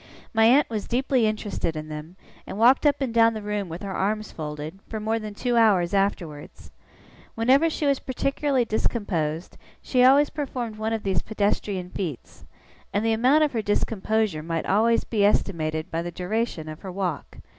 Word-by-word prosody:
My 225 0 +4
aunt 270 +6 +5
was 215 -3 -4
deeply 250 -1 +1
interested 205 -6 -2
in 155 0 -5
them, 155 +3 -8 0.3
and - - -6
walked 250 +6 +5
up 285 -1 +1
and 255 -4 -1
down 230 -1 +4
the 215 - -4
room 205 -3 -3
with 165 +4 -7
her 195 -1 -4
arms 215 +3 -1
folded, 150 +3 -6
for 220 - -4
more 220 +1 -1
than 215 -2 -7
two 245 +2 0
hours 200 -5 +4
afterwards. 180 -7 -2 0.6
Whenever 265 +8 +4
she 310 - -3
was 280 -2 +2
particularly 270 0 0
discomposed, 180 -8 -2 0.2
she 250 -1 +2
always 280 +3 +5
performed 250 -7 -4
one 220 +1 -2
of 225 -1 -2
these 190 -5 0
pedestrian 200 -3 -2
feats; 165 -10 -6 0.4
and 205 +2 0
the 225 - +3
amount 260 +7 +4
of 300 - +1
her 230 - -1
discomposure 210 -3 0
might 165 0 -3
always 225 +4 +3
be 215 -3 0
estimated 160 -5 0
by 165 - -1
the 175 - -4
duration 180 -2 -3
of 155 0 -7
her 190 - -7
walk. 180 -2 -4
215 Hz, 180 wpm, -25 LUFS, 180-235 Hz, 0.6 s, aunt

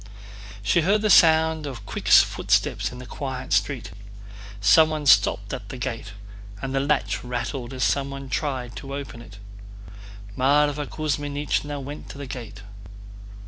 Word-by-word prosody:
She 170 +11 +3
heard 205 +6 +2
the 215 - +3
sound 160 -2 +5
of 120 -7 -8
quick - - -6
footsteps - - +3
in 125 - -9
the 125 - -9
quiet 130 -1 -5
street. 120 -9 0 0.7
Someone 155 +9 +4
stopped 135 - +4
at - - -6
the - - -7
gate, 105 - -5 0.5
and 135 +4 -4
the 135 - +1
latch 110 -9 0
rattled 125 +1 -4
as 130 -2 -3
someone 140 -1 -1
tried 130 -3 -3
to 140 0 -6
open 135 -4 -7
it. 105 -3 -13 1.0
Mávra 145 +2 +2
Kuzmínichna 145 -1 -2
went 145 +3 -8
to - - -9
the 140 - -6
gate. 115 -6 -8
140 Hz, 140 wpm, -24 LUFS, 125-150 Hz, 1.0 s, sound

